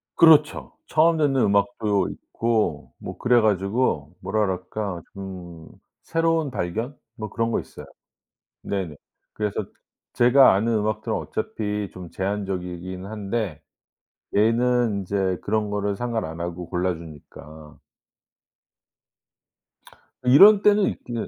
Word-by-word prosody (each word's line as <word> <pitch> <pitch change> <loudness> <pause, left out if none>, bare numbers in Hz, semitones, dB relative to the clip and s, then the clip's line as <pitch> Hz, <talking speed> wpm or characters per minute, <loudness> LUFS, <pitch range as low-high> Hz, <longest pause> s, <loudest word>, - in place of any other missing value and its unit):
그렇죠. 155 -2 +5 0.2
처음 165 +1 +3
듣는 140 -4 +2
음악도 100 -1 +1
있고 110 -10 -2
뭐 - - -8
그래 120 -1 +3
가지고 100 - 0
뭐라 100 +4 -1
그럴까 95 0 -4
좀 90 -4 -9 0.4
새로운 165 -2 0
발견 115 +7 -3 0.2
뭐 110 -3 -6
그런 115 +2 -1
거 - - +1
있어요. - - -11 0.8
네네. 95 -7 -4 0.4
그래서 105 0 -2 0.5
제가 125 +3 +6
아는 110 +4 +1
음악들은 105 0 -2
어차피 105 -2 -4
좀 90 -2 -10
제한적이긴 95 -2 -4
한데 100 -5 -4 0.8
얘는 115 0 +2
인제 95 -1 -1
그런 105 0 -1
거를 100 -1 -1
상관 115 0 -2
안 80 +1 -7
하고 85 0 -5
골라 90 0 -1
주니까. 75 -1 -13 2.5
이런 195 +12 +8
때는 205 -1 +4
있 - - -8
근데 120 -2 -4
105 Hz, 240 characters per minute, -24 LUFS, 90-120 Hz, 2.5 s, 이런